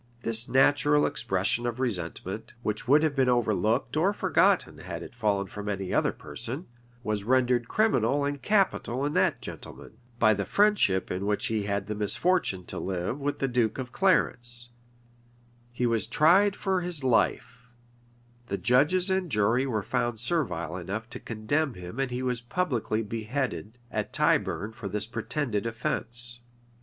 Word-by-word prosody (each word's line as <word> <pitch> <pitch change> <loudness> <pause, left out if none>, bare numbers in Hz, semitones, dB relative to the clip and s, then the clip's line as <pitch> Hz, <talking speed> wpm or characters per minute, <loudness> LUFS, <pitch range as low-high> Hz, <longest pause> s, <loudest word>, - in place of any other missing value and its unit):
This 115 +1 0
natural 145 +2 +4
expression 110 +2 0
of 120 +1 -4
resentment, 95 -3 -4
which 105 +2 -2
would 145 +4 +5
have 155 -3 +1
been 130 -2 +3
overlooked 115 +1 +1
or 180 +6 +2
forgotten - - +2
had - - -6
it - - -11
fallen 105 -4 0
from 105 +2 -6
any 95 -2 -3
other - - +2
person, 135 +9 -7 0.4
was 105 -3 -2
rendered 125 0 +2
criminal 145 - +2
and 145 -1 -3
capital 185 - +1
in 145 - -1
that - - +1
gentleman, - - -8 0.2
by 110 -2 +5
the 100 -1 -1
friendship 200 - +2
in 95 +2 -2
which 105 0 0
he 110 -2 -1
had 100 -1 -1
the 105 - -3
misfortune 105 - 0
to - - -5
live 95 +7 -3
with 145 0 -2
the 135 - 0
duke 120 -4 0
of 130 -2 -5
Clarence; 120 -10 +1 1.0
he 120 +1 -1
was 115 -2 0
tried 185 - +4
for 190 -2 0
his 175 -5 +1
life; 125 0 0 0.8
the 100 - -2
judges 150 - +3
and 190 -2 0
jury 115 +4 +2
were 110 -5 -1
found 120 -2 -1
servile 110 - -1
enough 100 +5 -5
to - - -4
condemn 125 +6 -1
him 90 +6 -8
and 135 -1 0
he 125 +1 -3
was 125 -2 -1
publicly 120 -6 -1
beheaded 115 +1 -3
at - - -3
Tyburn 105 +2 +1
for 110 -3 -7
this 105 +1 -1
pretended 115 -1 -2
offence. 120 +1 -2
120 Hz, 160 wpm, -27 LUFS, 105-140 Hz, 1.0 s, would